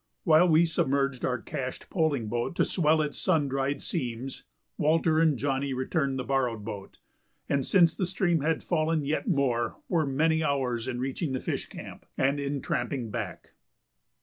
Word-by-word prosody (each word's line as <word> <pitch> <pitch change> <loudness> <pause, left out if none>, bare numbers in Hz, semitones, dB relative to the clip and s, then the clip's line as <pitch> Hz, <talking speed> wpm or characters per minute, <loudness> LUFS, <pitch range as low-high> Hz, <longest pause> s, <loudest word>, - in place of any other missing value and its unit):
While 165 +2 +5
we 160 +1 +5
submerged 140 -4 0
our 125 -1 0
cached 135 -4 -6
poling 150 - +1
boat 120 +8 -2
to - - +3
swell 155 -3 +2
its 145 -1 -4
sun 160 -6 +2
dried 135 +1 -1
seams, 125 +2 -4 0.3
Walter 160 +1 +2
and 160 -4 +3
Johnny 135 0 -1
returned 135 +1 -1
the 130 - -2
borrowed 125 -4 -1
boat, 100 -3 -7 0.5
and, 140 -1 +1
since 170 +2 +4
the 185 - -1
stream 175 -3 +1
had 160 +2 0
fallen 155 -3 0
yet 155 - -1
more, 135 - +1
were 160 -4 +1
many 160 +4 +2
hours 130 -5 -1
in 125 -1 -3
reaching 135 +3 -2
the 130 - -1
fish - - -3
camp - - -10
and 140 +2 +2
in 140 -1 -3
tramping 120 -6 -2
back. - - -5
140 Hz, 170 wpm, -28 LUFS, 130-160 Hz, 0.5 s, While